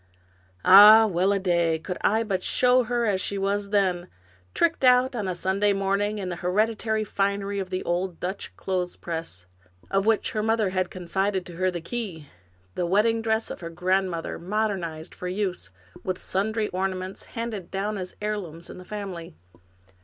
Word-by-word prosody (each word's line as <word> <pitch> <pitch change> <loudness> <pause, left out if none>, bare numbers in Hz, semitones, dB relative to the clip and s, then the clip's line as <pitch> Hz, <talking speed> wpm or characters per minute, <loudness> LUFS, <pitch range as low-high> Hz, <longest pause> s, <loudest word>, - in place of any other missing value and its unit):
Ah, 210 +3 +10
well 190 -1 +1
a 200 - +2
day! 170 -4 +1
Could 180 +3 -6
I 220 +2 +2
but 195 -4 -2
show 250 +5 +3
her 240 0 0
as 195 -3 +1
she 200 - -2
was 200 +1 -1
then, 185 -4 +1 0.5
tricked 335 -4 +1
out 250 +1 +5
on 210 -5 -2
a 185 - -2
Sunday 195 +3 +1
morning 200 +2 0
in 190 -3 -4
the 175 - -4
hereditary 215 +4 0
finery 200 0 -1
of 190 -1 -4
the 185 - -3
old 175 0 -2
Dutch 190 +2 -4
clothespress, 170 - -4 0.5
of 195 +2 +1
which 225 -1 +2
her 215 - -1
mother 220 -2 +1
had 185 -1 0
con 180 -2 -9
fided 190 0 0
to 175 - -10
her 185 +1 +2
the 175 -2 -4
key! 185 -5 -5 0.5
The 175 - -1
wedding 220 +5 +2
dress 220 0 0
of - - -7
her 170 - -6
grand 185 +3 +1
mother, 165 -2 -5
modernized 180 -5 -3
for 180 - -6
use, 185 - -3 0.3
with 185 -1 -2
sundry 215 +4 -1
ornaments, 185 0 -3
handed 225 -6 -4
down 200 +1 -2
as 185 0 -6
heirlooms 180 -6 -4
in - - -10
the 180 - -11
family. 180 -5 -7
195 Hz, 175 wpm, -25 LUFS, 180-210 Hz, 0.5 s, Ah